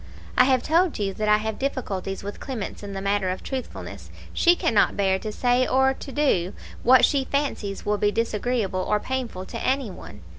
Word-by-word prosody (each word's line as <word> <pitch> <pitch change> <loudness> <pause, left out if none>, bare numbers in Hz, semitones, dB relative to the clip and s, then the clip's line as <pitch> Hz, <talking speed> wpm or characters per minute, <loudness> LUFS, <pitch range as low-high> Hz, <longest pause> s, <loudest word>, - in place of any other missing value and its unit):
"I 250 - +6
have 260 -2 +2
told 335 +2 +2
you 195 -2 -1
that 215 +2 -1
I 210 - +6
have 220 0 -4
difficulties 200 -9 -3
with 205 +1 -6
Clemence 250 -7 -5
in 200 -1 -7
the 195 0 -5
matter 200 -1 +1
of 185 - -4
truthfulness. 265 -2 -6 0.2
She 345 +1 +5
cannot 225 -10 +2
bear 190 -1 +2
to 215 - -5
say 245 +3 +2
or 265 +1 +3
to 270 - -9
do 205 -12 +1 0.3
what 255 +2 +7
she 275 -2 +1
fancies 260 -9 -2
will 210 0 0
be 205 - +3
disagreeable 220 -3 -1
or 210 +2 +1
painful 240 -7 -4
to 230 - -7
any 260 -5 0
one. 75 - -11
220 Hz, 195 wpm, -24 LUFS, 200-260 Hz, 0.3 s, what